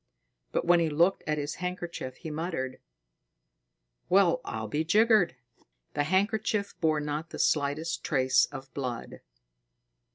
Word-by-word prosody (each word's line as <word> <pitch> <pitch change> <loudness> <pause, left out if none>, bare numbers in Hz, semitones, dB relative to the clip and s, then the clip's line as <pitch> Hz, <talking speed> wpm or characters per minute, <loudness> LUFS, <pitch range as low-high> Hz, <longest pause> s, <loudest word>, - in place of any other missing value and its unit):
But - - 0
when 175 0 +5
he 165 -1 +2
looked 170 +6 +2
at 150 0 0
his 145 0 -3
handkerchief, 175 -7 -4
he 160 - -7
muttered: 150 -5 -3 1.3
"Well, 185 -2 +4
I'll 110 0 -4
be 150 +9 -1
jiggered!" 215 - +4 0.6
The 145 0 0
handkerchief 205 +3 +1
bore 155 -2 +3
not 150 +2 -3
the - - -7
slightest 155 +3 0
trace 130 -3 +3
of 135 -1 -10
blood. 125 -4 -5
160 Hz, 130 wpm, -29 LUFS, 145-180 Hz, 1.3 s, when